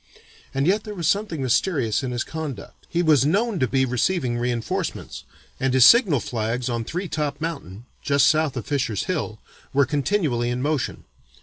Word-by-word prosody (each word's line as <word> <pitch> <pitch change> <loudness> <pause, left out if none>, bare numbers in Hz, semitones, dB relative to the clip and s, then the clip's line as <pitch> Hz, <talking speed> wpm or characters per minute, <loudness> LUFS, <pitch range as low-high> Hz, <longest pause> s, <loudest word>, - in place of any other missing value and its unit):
And 135 +1 0
yet 205 +5 +2
there 210 -1 -7
was 170 -4 -2
something 200 -8 0
mysterious 130 - +1
in 130 - -3
his 120 -1 -2
conduct. 155 -8 -7
He 175 0 0
was 155 -5 +4
known 200 +7 +1
to 130 - +2
be 130 +2 +1
receiving 125 +1 0
reinforcements, 120 -1 -3 0.3
and 130 0 +1
his 130 -2 +7
signal 185 - +6
flags 115 +2 -2
on 115 -1 -2
Three 180 - -4
top 150 -3 -3
Mountain 125 - -6 0.2
(just 140 -1 +3
south 155 -4 +2
of 120 - -4
Fisher's 130 -8 -1
Hill) 155 - -3 0.4
were 140 0 +4
continually 140 - 0
in 120 +1 -2
motion. 150 -3 -2
140 Hz, 175 wpm, -23 LUFS, 120-165 Hz, 0.4 s, his